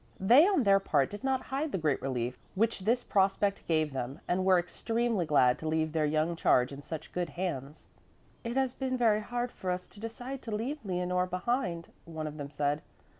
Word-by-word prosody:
They 245 Hz, -, +7 dB
on 385 Hz, -10 st, +3 dB
their 195 Hz, -2 st, +5 dB
part 145 Hz, -8 st, +1 dB
did 205 Hz, +3 st, -8 dB
not 265 Hz, -1 st, 0 dB
hide 280 Hz, +3 st, -2 dB
the -, -, -1 dB
great 155 Hz, -5 st, 0 dB
relief 125 Hz, -2 st, -2 dB, 0.2 s
which 225 Hz, +3 st, +1 dB
this 235 Hz, +6 st, +1 dB
prospect 195 Hz, 0 st, +1 dB
gave 155 Hz, -3 st, +1 dB
them 130 Hz, +1 st, -4 dB
and 185 Hz, +1 st, +1 dB
were 185 Hz, -1 st, +5 dB
extremely 225 Hz, +2 st, -1 dB
glad 125 Hz, -4 st, +4 dB
to 160 Hz, -, -5 dB
leave 160 Hz, 0 st, 0 dB
their 155 Hz, -1 st, +1 dB
young 155 Hz, +3 st, +1 dB
charge 125 Hz, -5 st, +3 dB
in 140 Hz, 0 st, -8 dB
such 160 Hz, +1 st, -7 dB
good 175 Hz, -2 st, -2 dB
hands. 150 Hz, -3 st, -4 dB, 0.6 s
"It 235 Hz, +2 st, -3 dB
has 265 Hz, -2 st, +1 dB
been 260 Hz, -1 st, -2 dB
very 220 Hz, -3 st, +3 dB
hard 245 Hz, +2 st, -3 dB
for 185 Hz, -, -5 dB
us 180 Hz, 0 st, -2 dB
to -, -, -15 dB
decide 245 Hz, +4 st, -6 dB
to 220 Hz, -2 st, -4 dB
leave 265 Hz, +7 st, -3 dB
Leonore 180 Hz, -1 st, 0 dB
behind," 180 Hz, -2 st, -2 dB, 0.2 s
one 160 Hz, -2 st, -5 dB
of 155 Hz, 0 st, -6 dB
them 145 Hz, -1 st, -5 dB
said. 145 Hz, +1 st, -1 dB
180 Hz, 205 wpm, -30 LUFS, 155-230 Hz, 0.6 s, They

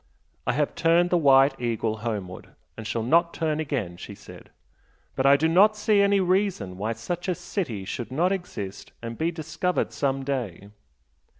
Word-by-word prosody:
"I -, -, +2 dB
have 150 Hz, 0 st, 0 dB
turned 170 Hz, +2 st, +3 dB
the 180 Hz, -, +4 dB
'White 135 Hz, -2 st, +5 dB
Eagle' 115 Hz, -2 st, -1 dB
homeward, 105 Hz, -5 st, -5 dB, 0.2 s
and 110 Hz, -1 st, -7 dB
shall 115 Hz, 0 st, -2 dB
not 170 Hz, +7 st, +3 dB
turn 155 Hz, -2 st, -1 dB
again" 125 Hz, -, -3 dB
she 100 Hz, +3 st, -9 dB
said -, -, -14 dB, 0.7 s
"But 135 Hz, -, +2 dB
I 140 Hz, +1 st, +7 dB
do 160 Hz, +3 st, +2 dB
not 200 Hz, +6 st, +5 dB
see 210 Hz, -1 st, +3 dB
any 200 Hz, 0 st, +4 dB
reason 185 Hz, -, 0 dB
why 110 Hz, +3 st, -1 dB
such 175 Hz, +12 st, -5 dB
a 180 Hz, -, 0 dB
city 125 Hz, -, -4 dB
should 120 Hz, +5 st, -5 dB
not 170 Hz, +7 st, +1 dB
exist 110 Hz, -, -5 dB
and 115 Hz, 0 st, -5 dB
be 160 Hz, +7 st, 0 dB
discovered 170 Hz, +2 st, -2 dB
some 135 Hz, -1 st, -1 dB
day. 105 Hz, -8 st, -4 dB
140 Hz, 175 wpm, -25 LUFS, 110-175 Hz, 0.7 s, I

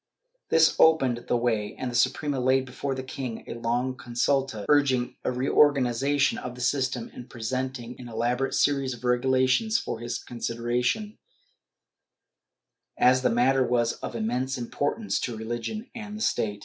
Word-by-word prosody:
This 160 Hz, 0 st, +5 dB
opened 135 Hz, -7 st, +4 dB
the 120 Hz, -, +2 dB
way, 110 Hz, -4 st, -1 dB
and 130 Hz, -1 st, -4 dB
the -, -, -6 dB
Suprema 135 Hz, +3 st, +1 dB
laid 130 Hz, +1 st, +2 dB
before 135 Hz, +2 st, -4 dB
the 130 Hz, -, -5 dB
king 130 Hz, -3 st, -6 dB
a -, -, -6 dB
long 120 Hz, +2 st, -1 dB
consulta, 120 Hz, -2 st, -1 dB
iirging 135 Hz, -3 st, +2 dB
a -, -, 0 dB
reorganization 135 Hz, +1 st, +2 dB
of 125 Hz, 0 st, -6 dB
the 125 Hz, -, -9 dB
system 130 Hz, -2 st, -1 dB
and 125 Hz, -, -10 dB
presenting 125 Hz, +1 st, -4 dB
an 125 Hz, -1 st, -9 dB
elaborate 120 Hz, +3 st, -1 dB
series 135 Hz, -3 st, +1 dB
of 120 Hz, -, -16 dB
regulations 130 Hz, -, +2 dB
for 115 Hz, -, -4 dB
his 120 Hz, +1 st, -3 dB
consideration, 120 Hz, -, -2 dB, 1.8 s
as 130 Hz, +1 st, +5 dB
the -, -, +2 dB
matter 130 Hz, +3 st, +3 dB
was 120 Hz, -1 st, +1 dB
of -, -, -6 dB
immense 125 Hz, +4 st, -1 dB
importance 145 Hz, -, -2 dB
to 120 Hz, -3 st, -4 dB
religion 120 Hz, -, -5 dB
and 215 Hz, -3 st, -7 dB
the -, -, -8 dB
state. 105 Hz, -, 0 dB
125 Hz, 150 wpm, -26 LUFS, 120-135 Hz, 1.8 s, This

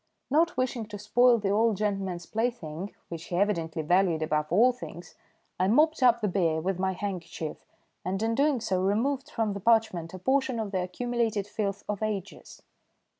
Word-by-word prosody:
Not 330 Hz, +4 st, +3 dB
wishing 250 Hz, -3 st, -1 dB
to 210 Hz, -1 st, -7 dB
spoil 240 Hz, +4 st, +4 dB
the 200 Hz, -3 st, -1 dB
old 220 Hz, 0 st, +2 dB
gentleman's 195 Hz, -4 st, -2 dB
plaything, 205 Hz, -6 st, -3 dB
which 170 Hz, -1 st, -6 dB
he 175 Hz, -, -4 dB
evidently 170 Hz, -5 st, 0 dB
valued 175 Hz, -1 st, +2 dB
above 150 Hz, -1 st, 0 dB
all 230 Hz, +8 st, +5 dB
things, 180 Hz, -8 st, -10 dB, 0.5 s
I 185 Hz, -, +3 dB
mopped 305 Hz, +8 st, +3 dB
up 240 Hz, -2 st, +5 dB
the 210 Hz, -, +1 dB
beer 170 Hz, -5 st, +1 dB
with 185 Hz, +2 st, -2 dB
my 190 Hz, 0 st, 0 dB
handkerchief, 180 Hz, -5 st, -5 dB, 0.4 s
and 190 Hz, +4 st, -2 dB
in 225 Hz, 0 st, +1 dB
doing 280 Hz, 0 st, +2 dB
so 185 Hz, -4 st, 0 dB
removed 260 Hz, +9 st, 0 dB
from 225 Hz, -7 st, -1 dB
the 200 Hz, -, -5 dB
parchment 190 Hz, -6 st, +1 dB
a -, -, -6 dB
portion 260 Hz, +3 st, +1 dB
of 215 Hz, -3 st, -3 dB
the 190 Hz, -2 st, 0 dB
accumulated 225 Hz, +2 st, -1 dB
filth 200 Hz, -1 st, -3 dB
of 210 Hz, -1 st, -3 dB
ages. 205 Hz, -3 st, -5 dB
205 Hz, 175 wpm, -28 LUFS, 180-235 Hz, 0.5 s, all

